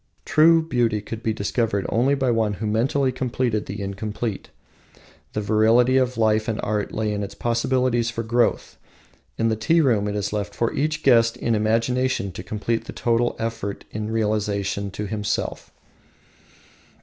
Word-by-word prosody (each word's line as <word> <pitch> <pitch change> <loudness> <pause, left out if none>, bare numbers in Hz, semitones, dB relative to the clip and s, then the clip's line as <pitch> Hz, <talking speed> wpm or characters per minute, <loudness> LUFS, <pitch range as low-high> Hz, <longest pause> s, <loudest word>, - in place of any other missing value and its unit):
True 165 +1 +5
beauty 120 -8 +1
could 110 +2 -7
be 110 - 0
discovered 105 -1 -1
only 130 +5 +2
by 130 -3 +1
one 110 -3 +1
who 105 +2 -5
mentally 130 +5 +1
completed 125 -3 -1
the 100 - -5
incomplete. 105 +2 -4 0.8
The 105 - -1
virility 115 +5 +4
of 125 -1 +1
life 110 -1 +2
and 110 - -2
art 105 -1 -1
lay 110 -1 -1
in 105 - -2
its 100 - -6
possibilities 120 0 +1
for 115 0 -4
growth. 120 +1 0 0.6
In 115 0 +1
the 110 - +1
tea 135 +10 +2
room 115 -9 +2
it 105 - -2
is 105 0 -2
left 105 -1 -3
for 115 - 0
each 155 +2 -1
guest 115 -2 +4
in 115 - 0
imagination 115 0 0
to 90 - -7
complete 110 +3 -2
the - - -8
total 120 0 +1
effect 115 -3 -4
in 105 0 -4
relation 105 -2 -1
to 105 +2 -5
himself. 105 0 -3
115 Hz, 160 wpm, -23 LUFS, 105-120 Hz, 0.8 s, True